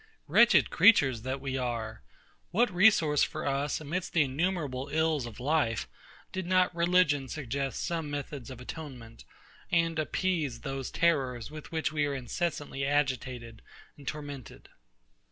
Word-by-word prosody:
Wretched - - +5
creatures 135 - +5
that 130 +3 -3
we 135 -1 -3
are! 115 -4 -3 0.5
what 220 +2 +2
resource 175 -6 +5
for - - -1
us 140 +1 0
amidst 170 +5 -4
the 165 - +5
innumerable 140 -2 -2
ills 155 -4 +1
of 115 - -10
life, 130 - 0 0.4
did 190 -2 -4
not 185 0 +3
religion 170 -5 +3
suggest 135 -1 -3
some 165 -4 -2
methods 145 -3 -5
of 130 -2 -9
atonement, 125 -4 -9 0.5
and 165 -1 +2
appease 155 -5 -1
those 135 -1 -4
terrors 135 -7 0
with 155 -1 -9
which 160 -1 -1
we 150 -1 +1
are 140 - -2
incessantly 140 +2 -3
agitated 130 -5 -1 0.3
and 140 -2 -15
tormented? 145 -5 -7
145 Hz, 135 wpm, -30 LUFS, 130-165 Hz, 0.5 s, Wretched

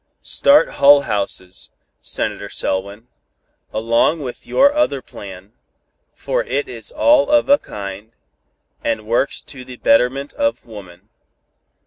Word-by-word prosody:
"Start 285 +1 +4
Hull 140 0 +7
Houses, 100 -5 -3 0.3
Senator - - -3
Selwyn, 100 +4 -3 0.6
along 115 +8 +1
with 125 -2 -8
your 280 +2 +4
other 300 - +1
plan, 100 -3 -12 0.6
for - - -2
it 465 -4 -2
is 390 - -7
all 295 - +3
of 295 0 +3
a 285 +1 +6
kind, 100 +1 -8 0.7
and 110 -2 -2
works 120 +5 0
to 130 -3 -10
the 125 -1 -11
betterment 125 +6 +2
of 285 0 -1
woman. 100 -3 -13
120 Hz, 120 wpm, -19 LUFS, -, 0.7 s, Hull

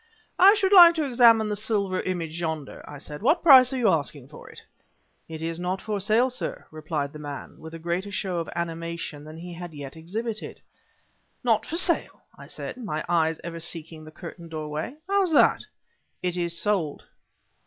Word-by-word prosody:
"I 390 +4 +8
should 395 -1 +1
like 345 -3 +10
to 320 - 0
examine 235 -5 +5
the 210 - -1
silver 200 -3 0
image 170 -3 -4
yonder," 160 -4 -4
I 145 - -8
said; 150 +1 -8
"what 295 - +2
price 260 -5 +8
are 265 - -2
you 235 -5 +3
asking 145 -5 -1
for 150 - -13
it?" - - -13 0.7
"It 160 0 -7
is 165 0 -3
not 180 +2 -2
for 210 -1 -3
sale, 225 +6 +2
sir," 250 - -5
replied 155 -2 -4
the 150 - -9
man, 145 -2 -8
with 160 +1 -10
a - - -6
greater 175 +4 -3
show 185 -2 -2
of 165 - -5
animation 165 -3 -5
than 155 +1 -10
he 175 +1 -8
had 170 -1 -9
yet 140 -1 -8
exhibited. 215 +7 -5 0.8
"Not 225 -3 +1
for 330 - -3
sale!" 345 -1 +2
I - - -13
said, - - -7
my 195 -11 -4
eyes 165 -2 +1
ever 170 -1 -6
seeking 165 -1 -5
the 155 - -11
curtained 170 +1 -10
doorway; 155 - -5
"how's 390 -4 +1
that?" - - +4 0.6
"It 180 -1 -1
is 170 -1 -2
sold." 185 -8 -1
175 Hz, 185 wpm, -25 LUFS, 160-225 Hz, 0.8 s, like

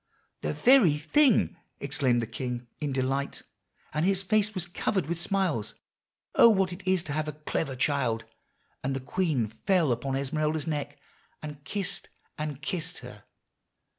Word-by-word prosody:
"'The 75 - -1
very 240 - +6
thing!' 210 - +3 0.2
exclaimed 130 -4 +1
the - - -1
king 125 +1 -4
in 150 -2 -2
delight; 135 +1 -1 0.5
and 155 - 0
his 195 +1 +2
face 215 +1 +2
was 180 -2 0
covered 180 0 -1
with 170 +2 -2
smiles. 175 - 0 0.6
'Oh, 235 - +8
what 190 -4 +2
it 175 - -9
is 185 -2 +3
to 150 - -5
have 155 0 -1
a 150 - -3
clever 150 -1 -3
child!' 125 -4 0 0.6
and 135 +1 -1
the - - -1
queen 150 -3 0
fell 150 - +1
upon 130 +3 -1
Esmeralda's 150 +2 0
neck, 145 -2 -3 0.5
and 150 -2 -7
kissed 200 -3 -3 0.3
and 150 -1 -5
kissed 175 +1 -3
her. 115 -4 -12
150 Hz, 155 wpm, -28 LUFS, 135-180 Hz, 0.6 s, Oh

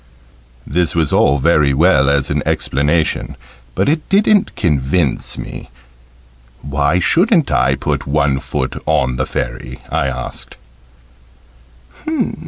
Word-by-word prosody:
This 85 +2 0
was 80 -3 +1
all 70 - +3
very 75 -1 +2
well 70 -3 +4
as 70 -2 +1
an - - 0
explanation, 70 -4 0 0.4
but - - 0
it 155 +2 -1
didn't 205 +1 +2
convince 75 -2 0
me. - - -8 0.9
"Why 70 +3 0
shouldn't 170 - +2
I - - +2
put - - -3
one 70 -1 +1
foot 65 -1 -4
on 65 0 +1
the - - -1
Fairy?" 65 0 -5
I 75 -3 0
asked. 60 -2 -6
75 Hz, 115 wpm, -16 LUFS, 65-85 Hz, 0.9 s, well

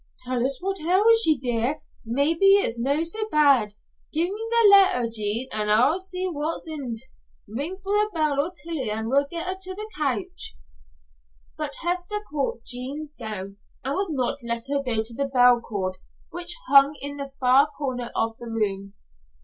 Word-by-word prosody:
"Tell 250 -1 -1
us 270 +1 0
what 390 0 -2
ails 415 +7 +5
ye, 310 -2 +4
dear; 245 +2 -1 0.2
maybe 310 - +3
it's 400 - +1
no 275 +6 0
so 430 +6 -3
bad. 275 - +4 0.4
Gie 335 +4 0
me 440 +3 -5
the 465 -2 +5
letter, 385 -11 +6
Jean, 225 +2 -1
an' 210 -1 -1
I'll 245 - +4
see 370 0 -3
what's 320 -1 -3
intil't. 270 -8 -5 0.5
Ring 285 - -4
the 415 +2 +1
bell 310 -5 0
for 290 +5 0
Tillie 315 -8 -3
an' 220 +1 -2
we'll 280 +2 +2
get 335 -1 -4
her 370 +1 -2
to 375 0 -4
the 425 +2 -6
couch." 255 - -3 1.0
But - - -5
Hester 355 +4 -2
caught 275 -5 -2
Jean's 280 +5 -5
gown 205 -6 -7 0.3
and 270 +2 -2
would 390 +2 -1
not 275 -2 -1
let 235 -1 -3
her 280 - +1
go 230 -5 0
to 230 +1 -6
the 275 +3 -2
bell 245 -2 +6
cord 190 -5 -4 0.3
which 350 0 -2
hung 275 +2 +6
in 285 +1 -5
the 280 -1 -5
far 265 +3 +5
corner 255 -5 -4
of 225 0 0
the 240 - -8
room. 200 -3 -2
280 Hz, 175 wpm, -24 LUFS, 235-345 Hz, 1.0 s, letter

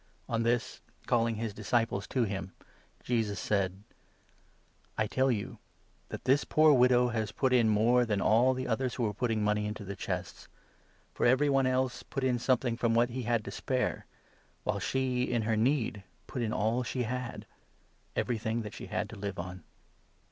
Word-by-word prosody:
On 115 0 0
this, 120 +2 0 0.2
calling 115 -2 +2
his 110 0 -3
43 105 - -10
disciples 115 -4 0
to 130 - +1
him, 95 -3 -4 0.5
Jesus 110 -5 0
said: 95 -1 -1 0.5
" - - -36
I 110 - +2
tell 130 +5 +1
you 105 -4 -3 0.5
that - - -7
this 135 +3 +4
poor 155 -1 +5
widow 125 -1 +5
has 110 -2 -2
put 130 -2 +1
in 120 -3 +4
more 115 +4 +4
than 105 -4 0
all 120 +6 +4
the 130 0 -3
others 125 +2 -1
who 125 - -2
were 105 -2 0
putting 110 0 0
money 105 0 +1
into 105 -1 -6
the 100 +1 -5
chests; 90 -1 -5 0.7
for - - +2
every 130 +4 +4
44 - - +2
one 135 -1 +3
else 130 -1 0
put 135 - -5
in 125 -2 +2
something 120 -1 +1
from 115 -1 +1
what 120 +1 +3
he 130 +2 -3
had 115 -3 +1
to 100 - -5
spare, 130 +5 -2 0.6
while - - -1
she, 130 -2 0
in 120 -2 0
her 110 0 +1
need, 115 -2 +1 0.2
put 125 - -5
in 110 -2 -1
all 110 +4 +1
she 125 0 -2
had 125 +1 -4 0.3
— - - -38
everything 115 -1 -1
that 105 - -7
she - - -8
had - - -2
to - - -8
live 100 -1 -4
on." 90 +1 -6
115 Hz, 190 wpm, -30 LUFS, 105-125 Hz, 0.7 s, poor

